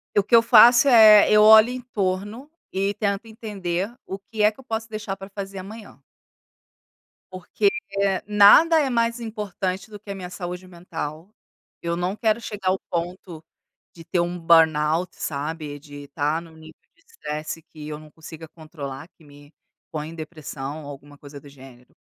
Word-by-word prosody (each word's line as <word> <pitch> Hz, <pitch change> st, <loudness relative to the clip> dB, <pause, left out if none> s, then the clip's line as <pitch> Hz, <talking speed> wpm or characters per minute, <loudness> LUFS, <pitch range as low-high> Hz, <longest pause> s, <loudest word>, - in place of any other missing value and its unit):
E -, -, +5 dB
o -, -, +1 dB
que 235 Hz, -, +3 dB
eu 230 Hz, -, +6 dB
faço 235 Hz, +3 st, +7 dB
é: 215 Hz, -4 st, +7 dB
eu 210 Hz, 0 st, +6 dB
olho 220 Hz, +2 st, +8 dB
em 255 Hz, 0 st, -6 dB
torno 205 Hz, +4 st, -4 dB, 0.2 s
e 195 Hz, +1 st, -1 dB
tento 200 Hz, +1 st, -2 dB
entender 205 Hz, -3 st, -4 dB
o 195 Hz, +1 st, -7 dB
que 210 Hz, +1 st, -4 dB
é 210 Hz, -, +5 dB
que 215 Hz, -, -23 dB
eu -, -, -13 dB
posso 225 Hz, -2 st, -4 dB
deixar 215 Hz, -3 st, -5 dB
para 195 Hz, +1 st, -10 dB
fazer 195 Hz, -1 st, -7 dB
amanhã. 200 Hz, -6 st, -11 dB, 1.3 s
Porque 185 Hz, -, 0 dB, 0.6 s
nada 210 Hz, +11 st, +6 dB
é 280 Hz, -, 0 dB
mais 235 Hz, -1 st, 0 dB
importante 200 Hz, -4 st, -5 dB
do 210 Hz, -1 st, -10 dB
que 205 Hz, -, -17 dB
a -, -, -5 dB
minha 180 Hz, -2 st, -8 dB
saúde 180 Hz, 0 st, -7 dB
mental. 170 Hz, +1 st, -8 dB, 0.5 s
Eu 170 Hz, 0 st, -2 dB
não 180 Hz, +3 st, -2 dB
quero 220 Hz, 0 st, 0 dB
chegar 205 Hz, -5 st, -4 dB
ao 190 Hz, -, 0 dB
ponto 170 Hz, -1 st, -5 dB, 0.5 s
de 165 Hz, -, -13 dB
ter 175 Hz, -, -1 dB
um 175 Hz, +1 st, -2 dB
burnout, 165 Hz, 0 st, +3 dB
sabe, 150 Hz, 0 st, -5 dB
de 145 Hz, -1 st, -12 dB
estar 150 Hz, +3 st, -2 dB
em -, -, -14 dB
um 160 Hz, -, -18 dB
nível 160 Hz, 0 st, -14 dB, 0.2 s
de 330 Hz, -, -31 dB
estresse 155 Hz, -, -7 dB
que 150 Hz, -1 st, -12 dB
eu 150 Hz, 0 st, -6 dB
não 155 Hz, 0 st, -15 dB
consiga 160 Hz, 0 st, -11 dB
controlar, 155 Hz, -3 st, -9 dB
que 165 Hz, -, -22 dB
me 145 Hz, +1 st, -18 dB, 0.4 s
põe 155 Hz, 0 st, -5 dB
em 165 Hz, -, -10 dB
depressão 155 Hz, -2 st, -7 dB
ou 145 Hz, -, -9 dB
alguma 145 Hz, +1 st, -12 dB
coisa 145 Hz, 0 st, -12 dB
do 145 Hz, -, -16 dB
gênero. 130 Hz, -3 st, -17 dB
180 Hz, 180 wpm, -23 LUFS, 155-215 Hz, 1.3 s, olho